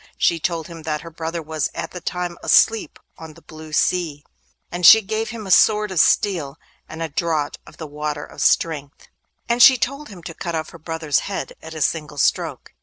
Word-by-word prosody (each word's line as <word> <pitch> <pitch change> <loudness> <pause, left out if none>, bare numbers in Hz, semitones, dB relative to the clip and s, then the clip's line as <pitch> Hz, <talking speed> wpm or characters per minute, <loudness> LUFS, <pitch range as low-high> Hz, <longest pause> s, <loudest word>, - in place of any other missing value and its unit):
She 170 - +2
told 165 -1 -2
him 165 0 -10
that 155 -1 -3
her 165 - -10
brother 165 +1 -5
was 155 -2 -2
at - - -5
that 180 -2 -9
time 175 0 -3
asleep 225 -1 +3 0.2
on 160 -1 -10
the - - -17
blue 155 0 -12
sea, 155 -3 0 0.5
and 175 +1 -5
she 220 +5 +9
gave 220 +3 -3
him 230 -3 -7
a 190 - -4
sword 210 +2 +4
of 185 - 0
steel 160 -6 +2 0.3
and 160 +1 -6
a 165 - -4
draught 155 -1 -2
of - - -15
the 160 - -7
Water 150 0 -4
of - - -10
Strength, 145 -3 0 0.4
and 235 +1 +1
she 260 +1 +9
told 275 +5 -3
him 185 -5 -12
to 165 - -7
cut 170 +1 -5
off 160 -1 -4
her 165 - -13
brother's 160 -2 -1
head 195 - -4
at 160 0 -10
a 155 - 0
single 150 -2 -2
stroke. 135 - -1
165 Hz, 210 wpm, -21 LUFS, 155-185 Hz, 0.5 s, she